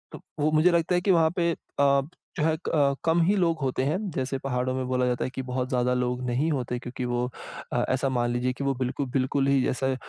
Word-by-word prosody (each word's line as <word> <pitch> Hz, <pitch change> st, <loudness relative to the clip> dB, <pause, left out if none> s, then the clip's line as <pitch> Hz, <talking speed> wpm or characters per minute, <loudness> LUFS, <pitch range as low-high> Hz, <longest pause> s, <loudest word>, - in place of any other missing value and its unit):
अ, -, -, -7 dB
त -, -, -14 dB, 0.2 s
वो 150 Hz, +1 st, +2 dB
मुझे 155 Hz, +3 st, +4 dB
लगता 170 Hz, +1 st, +2 dB
है 180 Hz, -, +2 dB
कि 190 Hz, +1 st, +2 dB
वहाँ 165 Hz, -2 st, +4 dB
पे 170 Hz, -2 st, +2 dB
अ, -, -, -2 dB, 0.2 s
जो 140 Hz, +3 st, 0 dB
है 160 Hz, 0 st, +2 dB
क -, -, +1 dB
अ, 140 Hz, -3 st, +3 dB
कम 165 Hz, +1 st, +3 dB
ही 195 Hz, +5 st, +3 dB
लोग 170 Hz, -4 st, +1 dB
होते 130 Hz, -1 st, 0 dB
हैं, 150 Hz, +5 st, +1 dB
जैसे 135 Hz, -1 st, -2 dB
पहाड़ों 130 Hz, -1 st, -1 dB
में 130 Hz, 0 st, -2 dB
बोला 125 Hz, 0 st, +1 dB
जाता 125 Hz, -1 st, 0 dB
है -, -, -2 dB
कि -, -, -2 dB
बहुत 125 Hz, 0 st, -3 dB
ज़्यादा 125 Hz, -1 st, +1 dB
लोग 125 Hz, 0 st, -1 dB
नहीं 130 Hz, +6 st, 0 dB
होते 125 Hz, -3 st, -2 dB
क्योंकि 125 Hz, +1 st, -5 dB
वो 120 Hz, 0 st, -1 dB, 0.4 s
अ, -, -, +1 dB
ऐसा 130 Hz, +1 st, +1 dB
मान 120 Hz, -2 st, 0 dB
लीजिए 125 Hz, +1 st, 0 dB
कि 140 Hz, -, -6 dB
वो 140 Hz, 0 st, +1 dB
बिल्कुल 130 Hz, +2 st, -1 dB
बिल्कुल, 135 Hz, +1 st, +1 dB
ही 140 Hz, -2 st, +3 dB
ऐसा 130 Hz, 0 st, 0 dB
135 Hz, 255 wpm, -26 LUFS, 125-155 Hz, 0.4 s, मुझे